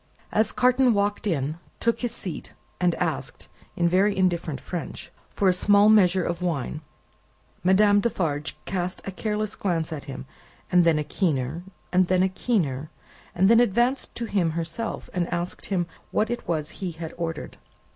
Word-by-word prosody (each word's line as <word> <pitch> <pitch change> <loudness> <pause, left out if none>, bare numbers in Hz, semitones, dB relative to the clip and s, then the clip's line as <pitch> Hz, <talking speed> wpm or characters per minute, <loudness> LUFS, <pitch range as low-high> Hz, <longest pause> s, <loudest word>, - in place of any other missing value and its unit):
As 215 +1 +2
Carton 250 -1 +3
walked 205 +1 0
in, 155 -2 -1 0.2
took 230 0 +1
his 245 -2 -2
seat 180 -9 -6 0.3
and 175 -1 +2
asked - - -3 0.3
(in 170 - +2
very 190 +4 +3
indifferent 170 -5 0
French) 175 -3 -6 0.2
for 200 - 0
a 185 - +5
small 205 +3 +5
measure 190 -4 +5
of 170 +1 -3
wine, 155 -3 -2 0.8
Madame 205 +2 +5
Defarge 160 -9 -1
cast 180 0 -3
a 195 - -4
careless 210 +2 -2
glance 165 -5 -1
at 145 -3 -7
him, 135 -1 -7 0.5
and 180 -1 +5
then 165 -2 +4
a 150 - 0
keener, 150 -2 -1 0.3
and 180 0 +4
then 185 0 +3
a 190 - +2
keener, 160 - -1 0.5
and 185 +2 +4
then 230 +2 +6
advanced 240 +4 +1
to 235 - -3
him 190 -6 +1
herself, 170 +7 -3
and 175 -2 -1
asked 175 0 -3
him 180 -3 0 0.2
what 220 +2 0
it 240 - -4
was 155 -2 -1
he 185 -3 -5
had 160 0 -7
ordered. 165 -2 -5
180 Hz, 165 wpm, -25 LUFS, 165-205 Hz, 0.8 s, then